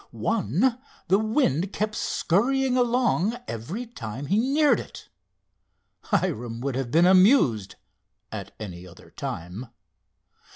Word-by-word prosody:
One 230 Hz, -, 0 dB, 0.3 s
the 195 Hz, +2 st, +5 dB
wind 215 Hz, -, +1 dB
kept 215 Hz, 0 st, -1 dB
scurrying 250 Hz, +8 st, +1 dB
along 240 Hz, -3 st, +1 dB
every 165 Hz, -, -5 dB
time 130 Hz, -, -7 dB
he 200 Hz, +9 st, +2 dB
neared 275 Hz, 0 st, +3 dB
it. -, -, -10 dB, 1.0 s
Hiram 115 Hz, 0 st, -1 dB
would 135 Hz, +1 st, -2 dB
have 130 Hz, -1 st, -3 dB
been 165 Hz, +7 st, +4 dB
amused 185 Hz, -, +4 dB, 0.6 s
at 100 Hz, -2 st, -6 dB
any 90 Hz, -4 st, -8 dB
other 85 Hz, -, -16 dB
time. 90 Hz, +9 st, -6 dB
185 Hz, 115 wpm, -25 LUFS, -, 1.0 s, the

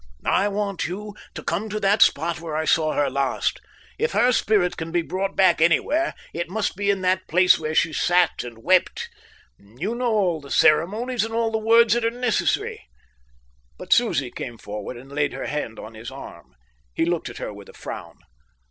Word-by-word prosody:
"I 200 Hz, -, +2 dB
want 200 Hz, -4 st, -2 dB
you 205 Hz, +4 st, -6 dB, 0.2 s
to -, -, -6 dB
come 200 Hz, +6 st, -2 dB
to 215 Hz, +1 st, -3 dB
that 200 Hz, +1 st, +2 dB
spot 160 Hz, +2 st, +3 dB
where 160 Hz, -2 st, -5 dB
I 160 Hz, -, -1 dB
saw 155 Hz, -1 st, +2 dB
her 145 Hz, -1 st, +1 dB
last. 135 Hz, 0 st, -1 dB, 0.4 s
If 465 Hz, -, 0 dB
her 250 Hz, +1 st, +4 dB
spirit 205 Hz, -6 st, +2 dB
can 160 Hz, 0 st, -6 dB
be 170 Hz, 0 st, +1 dB
brought 195 Hz, +3 st, -3 dB
back 190 Hz, -4 st, +4 dB
anywhere, 290 Hz, -, +2 dB, 0.2 s
it 170 Hz, 0 st, -3 dB
must 205 Hz, +1 st, -2 dB
be 200 Hz, +1 st, -1 dB
in 200 Hz, -1 st, +1 dB
that 185 Hz, 0 st, 0 dB
place 180 Hz, +2 st, +5 dB
where 155 Hz, 0 st, -3 dB
she 160 Hz, -, +2 dB
sat 175 Hz, +1 st, +2 dB
and 115 Hz, -2 st, -10 dB
wept. 185 Hz, 0 st, +2 dB, 0.5 s
You 125 Hz, -, -5 dB
know 240 Hz, 0 st, -1 dB
all 185 Hz, -7 st, +1 dB
the 140 Hz, -, -12 dB
ceremonies 215 Hz, -, +2 dB
and 225 Hz, 0 st, -4 dB
all 230 Hz, -1 st, +1 dB
the 220 Hz, -, 0 dB
words 225 Hz, 0 st, +5 dB
that 240 Hz, 0 st, 0 dB
are 230 Hz, -, +3 dB
necessary." 245 Hz, -1 st, -1 dB, 1.0 s
But -, -, +1 dB
Susie 130 Hz, -2 st, +1 dB
came 120 Hz, -2 st, -7 dB
forward 105 Hz, +3 st, -7 dB
and 135 Hz, +3 st, -13 dB
laid 145 Hz, 0 st, 0 dB
her -, -, -5 dB
hand 150 Hz, -7 st, -4 dB
on 110 Hz, -, -9 dB
his 110 Hz, +2 st, -8 dB
arm. 110 Hz, -, -11 dB, 0.4 s
He -, -, +1 dB
looked 170 Hz, -1 st, -1 dB
at -, -, -10 dB
her -, -, -5 dB
with 100 Hz, -1 st, -12 dB
a -, -, -13 dB
frown. -, -, -8 dB
180 Hz, 200 wpm, -23 LUFS, 150-210 Hz, 1.0 s, place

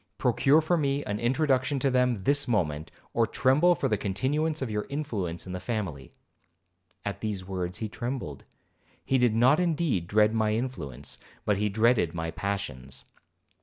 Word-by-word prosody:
Procure 150 Hz, +4 st, +4 dB
for 170 Hz, +3 st, +1 dB
me 140 Hz, -2 st, 0 dB
an 105 Hz, 0 st, -3 dB
introduction 130 Hz, +2 st, +1 dB
to 135 Hz, 0 st, +1 dB
them 125 Hz, -5 st, +2 dB
this 145 Hz, +4 st, +3 dB
moment, 80 Hz, -9 st, 0 dB, 0.2 s
or 115 Hz, -1 st, +2 dB
tremble 150 Hz, +7 st, +4 dB
for 135 Hz, -, 0 dB
the 105 Hz, -5 st, 0 dB
continuance 145 Hz, +11 st, 0 dB
of 130 Hz, -5 st, -3 dB
your 105 Hz, 0 st, -2 dB
influence 100 Hz, -, -3 dB
in 90 Hz, -, -6 dB
the 90 Hz, -, -3 dB
family.' 90 Hz, -, -4 dB, 0.9 s
At 100 Hz, -, -4 dB
these 105 Hz, -4 st, -3 dB
words 90 Hz, -1 st, -4 dB
he 110 Hz, -, -3 dB
trembled. 120 Hz, -, -5 dB, 0.6 s
He 135 Hz, -, +2 dB
did 120 Hz, -3 st, +3 dB
not 130 Hz, +7 st, +5 dB
indeed 160 Hz, -, 0 dB
dread 105 Hz, +2 st, +3 dB
my 110 Hz, -1 st, +1 dB
influence, 100 Hz, -, -4 dB, 0.3 s
but 105 Hz, -2 st, +2 dB
he 105 Hz, 0 st, +1 dB
dreaded 110 Hz, -5 st, +2 dB
my 80 Hz, 0 st, -3 dB
passions. 80 Hz, -8 st, -4 dB
110 Hz, 165 wpm, -28 LUFS, 95-135 Hz, 0.9 s, not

